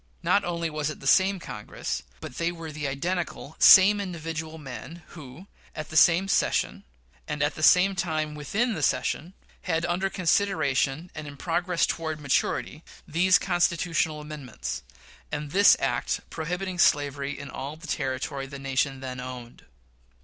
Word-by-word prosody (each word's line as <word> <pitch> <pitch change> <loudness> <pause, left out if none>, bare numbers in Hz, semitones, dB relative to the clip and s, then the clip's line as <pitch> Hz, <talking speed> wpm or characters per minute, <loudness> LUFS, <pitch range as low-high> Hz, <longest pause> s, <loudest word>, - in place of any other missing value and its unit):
Not 200 - +3
only 170 -2 -2
was 150 -1 -2
it 155 - -7
the - - -12
same 195 +1 +4
Congress, 105 -11 -5 0.2
but 125 - -8
they 170 +1 +1
were 165 -2 -8
the 150 -1 -4
identical 160 +2 -3
same 205 +2 +8
individual 165 -3 -5
men 150 +3 -9
who, 150 +2 -11 0.3
at 155 0 -6
the 155 - -8
same 175 +4 +5
session, - - +1 0.4
and 150 -1 -1
at 145 0 +1
the - - -8
same 180 +5 +6
time 160 -4 -2
within 200 - -1
the - - -4
session, 180 +4 -1 0.3
had 165 -2 -1
under 180 +3 0
consideration, 170 -5 0
and 150 -1 -7
in 145 -1 -9
progress 175 +2 0
toward 160 -2 -3
maturity, 145 +2 -1 0.2
these 175 +4 +4
Constitutional 170 -3 0
amendments, 150 - -6 0.5
and 150 -1 -4
this 200 +2 +6
act 120 -3 -1
prohibiting 180 +3 -4
slavery 145 -2 +2
in 140 -1 -8
all 140 +3 -6
the 165 +3 -13
territory 135 -2 -3
the 140 0 -8
nation 135 0 -1
then 130 -1 -6
owned. 125 -1 -9
155 Hz, 155 wpm, -26 LUFS, 140-175 Hz, 0.5 s, same